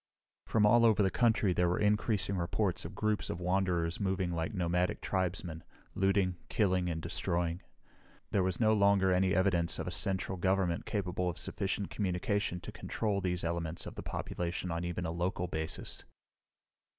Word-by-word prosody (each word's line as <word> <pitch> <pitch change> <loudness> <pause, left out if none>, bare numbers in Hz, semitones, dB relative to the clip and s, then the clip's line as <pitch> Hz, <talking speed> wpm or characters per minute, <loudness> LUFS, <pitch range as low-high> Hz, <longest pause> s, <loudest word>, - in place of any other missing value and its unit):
From 110 -2 +3
all 115 +3 +6
over 110 -3 +5
the 95 - +2
country 110 -5 +3
there 90 0 +2
were 90 - +1
increasing 105 -2 +1
reports 90 +2 -1
of - - -7
groups 110 -1 0
of 85 - -3
wanderers 90 -2 0
moving 95 -3 0
like 80 -1 -2
nomadic 90 -1 0
tribesmen, 90 -3 -2 0.3
looting, 95 -2 +2
killing, 95 -5 +2
and 80 -1 -2
destroying. 85 +2 -1 0.7
There 100 - +3
was 95 -1 0
no 110 -2 +4
longer 100 -2 +4
any 95 +1 +2
evidence 90 -3 +2
of - - -3
a - - -3
central 95 -1 -1
government 95 -2 +1
capable 90 -3 -1
of 90 - -5
sufficient 100 0 -3
communication 95 -1 -1
to - - -7
control 105 -3 -2
these 90 -1 -1
elements 85 -1 -2
of - - -7
the - - -6
population 90 +1 -3
on 85 +1 -2
even 85 +1 -3
a 80 - -2
local 90 +1 -1
basis. 80 -2 -5
90 Hz, 165 wpm, -32 LUFS, 85-100 Hz, 0.7 s, all